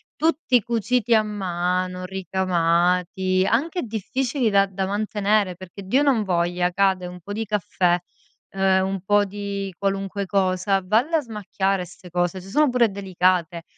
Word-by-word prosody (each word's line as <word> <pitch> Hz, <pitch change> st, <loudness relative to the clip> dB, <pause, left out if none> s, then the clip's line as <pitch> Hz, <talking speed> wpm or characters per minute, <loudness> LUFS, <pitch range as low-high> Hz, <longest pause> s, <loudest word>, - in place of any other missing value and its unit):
tutti 305 Hz, -6 st, +2 dB
cuciti 235 Hz, +1 st, 0 dB
a 220 Hz, -, +6 dB
mano, 185 Hz, -2 st, -2 dB
ricamati, 185 Hz, 0 st, +1 dB
anche 320 Hz, +9 st, 0 dB
difficili 245 Hz, +3 st, -1 dB
da 200 Hz, -1 st, +4 dB
da 190 Hz, 0 st, -3 dB
mantenere, 205 Hz, -2 st, 0 dB
perché 185 Hz, +2 st, -11 dB
Dio 260 Hz, +9 st, +2 dB
non 265 Hz, -7 st, +2 dB
voglia, 175 Hz, -1 st, 0 dB
cade 190 Hz, -1 st, +1 dB
un 180 Hz, 0 st, -9 dB
po' 205 Hz, -, -7 dB
di 225 Hz, +2 st, -2 dB
caffè, 185 Hz, -3 st, +1 dB, 0.5 s
uhm, 190 Hz, 0 st, +2 dB
un 195 Hz, -1 st, -3 dB
po' 205 Hz, +1 st, +3 dB
di 200 Hz, -1 st, -5 dB
qualunque 195 Hz, 0 st, -2 dB
cosa, 190 Hz, 0 st, +1 dB
valle 235 Hz, -, +2 dB
a -, -, 0 dB
smacchiare 195 Hz, -4 st, -2 dB
'ste 180 Hz, +1 st, -14 dB
cose, 175 Hz, +1 st, -1 dB
se 190 Hz, -, -12 dB
sono 300 Hz, +5 st, +3 dB
pure 245 Hz, -2 st, +3 dB
delicate. 185 Hz, -3 st, 0 dB
195 Hz, 150 wpm, -23 LUFS, 185-215 Hz, 0.5 s, a